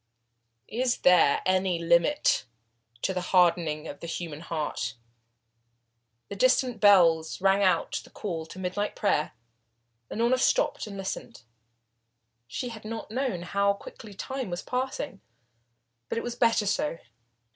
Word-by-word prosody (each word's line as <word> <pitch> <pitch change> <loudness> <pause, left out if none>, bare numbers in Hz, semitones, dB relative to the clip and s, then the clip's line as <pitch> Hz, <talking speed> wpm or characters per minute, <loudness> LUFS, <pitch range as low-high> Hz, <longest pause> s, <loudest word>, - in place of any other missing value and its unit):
Is 245 +2 0
there 180 -6 +5
any 185 -1 +2
limit 170 - +2 0.6
to 190 - +1
the 180 - -2
hardening 170 -4 +2
of 145 - -8
the 170 - -7
human 165 -3 -5
heart? 155 -8 -3 1.3
The 200 - -6
distant 250 +1 +2
bells 170 -6 +5
rang 195 +1 +3
out 185 -4 +1
the - - -16
call 165 -6 -5
to 185 - -11
midnight 190 +3 -2
prayer. 155 -7 0 0.8
Unorna 235 +3 +1
stopped - - +1
and 200 -1 -7
listened. 195 -1 -6 1.0
She 245 - -4
had 225 -2 -9
not 220 0 -6
known 245 -8 -2
how 200 +3 +1
quickly 200 +1 -11
time 265 +1 -4
was 175 0 -4
passing. 255 -3 -3 0.9
But - - -2
it - - -2
was 240 - -3
better 230 -3 +3
so. 165 -5 0
195 Hz, 135 wpm, -27 LUFS, 170-230 Hz, 1.3 s, there